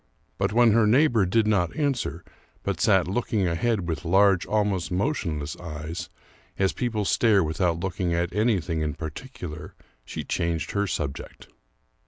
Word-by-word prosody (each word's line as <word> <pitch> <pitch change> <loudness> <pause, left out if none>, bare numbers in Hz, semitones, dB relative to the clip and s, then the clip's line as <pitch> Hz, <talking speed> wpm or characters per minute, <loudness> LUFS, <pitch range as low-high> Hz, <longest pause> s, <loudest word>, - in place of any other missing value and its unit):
But - - +1
when 120 +1 +5
her 110 0 +4
neighbor 120 -4 +4
did 110 +4 +2
not 95 -6 +1
answer, 135 - -1 0.4
but - - -2
sat 95 -5 +4
looking 100 -1 0
ahead 90 +3 0
with 80 0 -3
large, 95 +1 +3
almost 105 -4 0
motionless 90 - -1
eyes, 80 0 -6 0.5
as 95 -1 +1
people 110 -4 -2
stare 105 -2 +3
without 85 +1 0
looking 90 -1 -2
at 85 +1 -1
anything 100 -7 +1
in 75 -2 -2
particular, 80 - -8 0.3
she - - -6
changed 85 -1 -2
her 100 0 0
subject. 70 -4 -5
95 Hz, 145 wpm, -25 LUFS, 85-110 Hz, 0.5 s, when